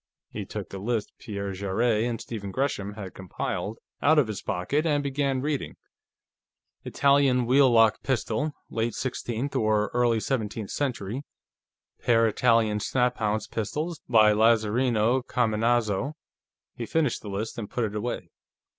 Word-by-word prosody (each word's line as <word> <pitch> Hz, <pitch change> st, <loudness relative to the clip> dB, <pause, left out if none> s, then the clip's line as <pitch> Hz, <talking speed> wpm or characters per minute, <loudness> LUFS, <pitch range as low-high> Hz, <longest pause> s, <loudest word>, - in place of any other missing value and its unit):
He -, -, -5 dB
took -, -, -6 dB
the 95 Hz, -, -6 dB
list 110 Hz, +1 st, -2 dB
Pierre 100 Hz, -2 st, -4 dB
Jarrett 105 Hz, +4 st, 0 dB
and 120 Hz, -1 st, -2 dB
Stephen 105 Hz, -4 st, -6 dB
Gresham 105 Hz, -4 st, -2 dB
had 100 Hz, -3 st, -7 dB
compiled 95 Hz, +3 st, -4 dB, 0.2 s
out 155 Hz, +2 st, +4 dB
of 150 Hz, -, +5 dB
his 110 Hz, -3 st, -5 dB
pocket 110 Hz, +10 st, -1 dB
and 145 Hz, -3 st, +1 dB
began 135 Hz, -1 st, 0 dB
reading: 145 Hz, 0 st, -2 dB, 1.1 s
"Italian 140 Hz, -3 st, +3 dB
wheel 130 Hz, +2 st, +5 dB
lock 115 Hz, -2 st, +4 dB
pistol, 130 Hz, +2 st, -1 dB, 0.2 s
late 115 Hz, +1 st, -1 dB
sixteenth 125 Hz, +1 st, -3 dB
or 110 Hz, -1 st, +2 dB
early 120 Hz, -2 st, +2 dB
seventeenth 110 Hz, -4 st, -3 dB
century; 125 Hz, -4 st, -2 dB, 0.8 s
pair 115 Hz, -1 st, +4 dB
Italian 110 Hz, -2 st, +2 dB
snaphaunce 110 Hz, -3 st, 0 dB
pistols, 150 Hz, -, -3 dB
by 110 Hz, -3 st, +6 dB
Lazarino 115 Hz, +2 st, +3 dB
Cominazo...." 120 Hz, +1 st, +1 dB, 0.6 s
He 115 Hz, -, -6 dB
finished 150 Hz, -7 st, 0 dB
the 105 Hz, -, -8 dB
list 105 Hz, +4 st, -4 dB
and 105 Hz, -, -5 dB
put 120 Hz, -, -2 dB
it 105 Hz, -1 st, -2 dB
away. 115 Hz, +3 st, -4 dB
115 Hz, 135 wpm, -26 LUFS, 105-130 Hz, 1.1 s, by